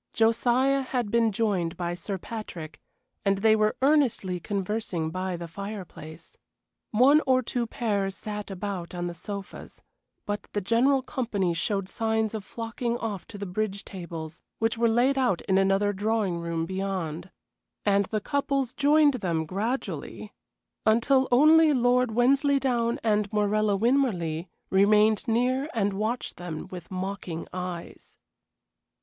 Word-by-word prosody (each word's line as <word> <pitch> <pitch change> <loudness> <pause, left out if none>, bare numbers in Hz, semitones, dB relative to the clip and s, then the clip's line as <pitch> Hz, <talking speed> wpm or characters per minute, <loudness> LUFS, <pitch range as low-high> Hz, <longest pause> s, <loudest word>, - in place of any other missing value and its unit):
Josiah 245 +4 +3
had 250 -5 -2
been 230 -1 +3
joined 195 -6 -1
by 175 -1 -2
Sir 185 +3 -4
Patrick, 180 -6 -8 0.4
and 195 -1 +2
they 220 +2 +4
were 215 0 +1
earnestly 260 -11 +2
conversing 195 -3 -2
by 185 0 -3
the 170 0 -6
fireplace. 175 -4 -9 0.5
One 270 +7 +5
or 255 -1 +4
two 240 0 -2
pairs 205 -6 -1
sat 210 -1 -6
about 190 -2 -5
on 175 0 -3
the 175 - -3
sofas; 200 +3 -8 0.4
but 205 0 -4
the 205 - +1
general 250 +7 +2
company 205 -10 -1
showed 195 +3 -1
signs 220 +1 -1
of 215 -2 -4
flocking 230 +3 -3
off 210 -6 -5
to 205 - -9
the 200 - -5
bridge 200 +1 -3
tables, 170 -4 -7 0.2
which 225 0 0
were 230 0 +2
laid 255 +4 +3
out 245 -9 +1
in 190 0 +2
another 195 +1 +2
drawing 205 -3 0
room 170 -1 -2
beyond. 185 -2 -3 0.6
And 200 -1 +3
the 215 +2 -2
couples 275 0 -1
joined 290 0 +4
them 165 -3 -1
gradually, 220 - -4 0.5
until 260 +4 +3
only 310 +4 +6
Lord 250 0 +3
Wensleydown 250 0 +2
and 210 -2 +1
Morella 210 -1 +2
Winmarleigh 190 - +1 0.2
remained 210 +3 +4
near 255 +5 +1
and 205 -2 +1
watched 215 +5 -2
them 175 -3 -6
with 175 -2 -8
mocking 185 -3 -5
eyes. 180 -2 -7
210 Hz, 140 wpm, -27 LUFS, 185-240 Hz, 0.6 s, only